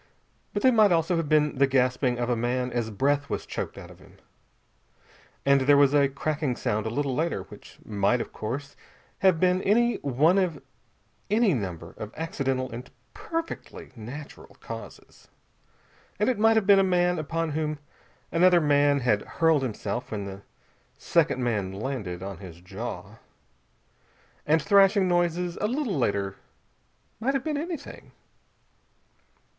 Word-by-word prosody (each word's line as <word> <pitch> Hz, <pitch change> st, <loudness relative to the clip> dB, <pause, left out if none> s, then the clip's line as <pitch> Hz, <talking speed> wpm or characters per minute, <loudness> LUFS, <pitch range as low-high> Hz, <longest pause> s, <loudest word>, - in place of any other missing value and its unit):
But 205 Hz, -, -3 dB
they 260 Hz, -, +6 dB
might 215 Hz, -4 st, +5 dB
also 170 Hz, +1 st, +2 dB
have 165 Hz, -3 st, -2 dB
been 150 Hz, -2 st, +2 dB
the 140 Hz, -, +5 dB
gasping 125 Hz, -1 st, +1 dB
of 120 Hz, 0 st, -1 dB
a 120 Hz, -, +1 dB
man 125 Hz, +2 st, -1 dB
as 120 Hz, -2 st, -2 dB
breath 140 Hz, +6 st, 0 dB
was -, -, -3 dB
choked -, -, -5 dB
out -, -, -10 dB
of -, -, -16 dB
him.... -, -, -19 dB, 1.3 s
And 140 Hz, 0 st, +4 dB
there 140 Hz, +2 st, +5 dB
was 140 Hz, 0 st, +5 dB
a 140 Hz, -2 st, +4 dB
cracking 145 Hz, -1 st, -2 dB
sound 110 Hz, -1 st, -2 dB
a -, -, -1 dB
little 140 Hz, +3 st, -1 dB
later, 155 Hz, -, -1 dB
which -, -, -14 dB
might 100 Hz, +3 st, +1 dB
of -, -, -6 dB
course 140 Hz, +6 st, -5 dB, 0.4 s
have 190 Hz, -4 st, +4 dB
been 185 Hz, +1 st, +3 dB
any 235 Hz, +5 st, +2 dB
one 150 Hz, +8 st, +2 dB
of 175 Hz, -6 st, -1 dB, 0.7 s
any 215 Hz, -2 st, +3 dB
number 90 Hz, -, -4 dB
of 110 Hz, 0 st, -6 dB
accidental 135 Hz, -5 st, -2 dB
and 120 Hz, +2 st, -8 dB, 0.2 s
perfectly 330 Hz, 0 st, -6 dB
natural 130 Hz, +7 st, -10 dB
causes. -, -, -10 dB, 0.9 s
And -, -, +1 dB
it 245 Hz, -5 st, 0 dB
might 225 Hz, +1 st, +5 dB
have 220 Hz, -3 st, +2 dB
been 200 Hz, 0 st, +6 dB
a -, -, +4 dB
man 180 Hz, -2 st, +2 dB
upon 165 Hz, +1 st, -2 dB
whom 155 Hz, 0 st, -2 dB, 0.5 s
another 175 Hz, +1 st, +5 dB
man 145 Hz, -2 st, +3 dB
had 105 Hz, -4 st, +2 dB
hurled 165 Hz, -3 st, +2 dB
himself, 120 Hz, -1 st, -4 dB
when 105 Hz, -2 st, -3 dB
the 100 Hz, 0 st, -8 dB, 0.6 s
second 130 Hz, -, +1 dB
man 105 Hz, -6 st, -1 dB
landed 100 Hz, -5 st, -4 dB
on 95 Hz, -2 st, -6 dB
his 90 Hz, -4 st, -11 dB
jaw. 100 Hz, +1 st, -7 dB, 1.3 s
And 160 Hz, +2 st, +4 dB
thrashing 200 Hz, -1 st, +5 dB
noises 175 Hz, 0 st, 0 dB
a 210 Hz, -, +2 dB
little 250 Hz, -, -1 dB
later 100 Hz, -6 st, -1 dB, 0.8 s
might 265 Hz, +5 st, 0 dB
have 270 Hz, -, -1 dB
been 310 Hz, -2 st, -2 dB
anything. 315 Hz, 0 st, -6 dB
145 Hz, 155 wpm, -26 LUFS, 120-180 Hz, 1.3 s, they